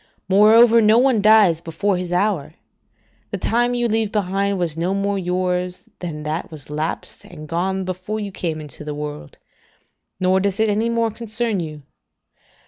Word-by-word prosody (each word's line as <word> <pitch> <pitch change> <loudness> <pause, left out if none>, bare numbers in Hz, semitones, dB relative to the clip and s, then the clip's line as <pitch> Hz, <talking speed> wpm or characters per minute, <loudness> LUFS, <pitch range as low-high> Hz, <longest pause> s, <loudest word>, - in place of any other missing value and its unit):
Moreover, 225 +4 +6
no 215 +1 +5
one 250 -3 +3
dies 205 -6 +5
before 185 +4 -1
his 180 -1 -4
hour: 180 -4 0 0.7
the - - -3
time 240 +1 +1
you 240 -1 +1
leave 220 -2 0
behind 200 -1 0
was 170 -4 -2
no 175 +4 -1
more 200 0 -1
yours 180 0 -2
than 155 -4 -5
that 155 +3 -3
was 150 -2 -11
lapsed 155 +2 -4
and 155 -3 -11
gone 190 +4 -1
before 185 +4 -4
you 205 -2 -5
came 165 -4 -3
into 150 -1 -9
the 150 -1 -5
world; 150 - -7 0.8
nor 185 +1 +3
does 195 0 -1
it 220 0 +3
any 215 +3 +1
more 230 -1 0
concern 225 -1 -2
you. 155 -3 -6
190 Hz, 165 wpm, -21 LUFS, 170-215 Hz, 0.8 s, Moreover